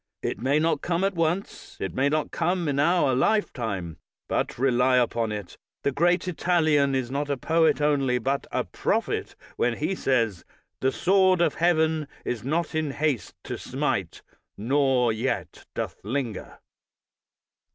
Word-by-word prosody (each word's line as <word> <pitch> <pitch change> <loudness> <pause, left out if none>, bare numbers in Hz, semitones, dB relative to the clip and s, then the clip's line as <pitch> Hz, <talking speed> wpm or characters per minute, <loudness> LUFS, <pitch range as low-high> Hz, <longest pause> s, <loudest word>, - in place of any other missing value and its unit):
It - - -2
may 135 +4 +2
not 155 -1 +1
come 175 +1 0
at 195 0 +1
once, 170 +3 -2
it 95 - -3
may 135 +2 +2
not 155 +1 -1
come 175 0 0
in 140 -1 0
our 150 -3 +3
lifetime; 115 - 0 0.3
but - - -1
rely 125 0 +3
upon 115 -2 +1
it, 105 -4 -7 0.2
the 140 - +2
great 175 +6 +2
Italian 155 -6 +2
is 130 -2 -2
not 145 +1 -2
a 140 - 0
poet 160 +5 +2
only, 140 -4 +2
but 135 +4 -1
a - - 0
prophet, - - -2 0.2
when 120 -1 +1
he 155 +6 -1
says: 115 - 0 0.4
"The 130 - +1
sword 185 +1 +3
of 170 - +3
heaven 160 -3 +2 0.2
is 115 -3 -3
not 155 +5 -1
in 155 -1 0
haste 140 -7 -1
to - - -5
smite, - - -2 0.3
Nor 130 0 +2
yet 120 +4 -3
doth - - -4
linger." 120 0 -4
140 Hz, 150 wpm, -26 LUFS, 125-165 Hz, 0.4 s, our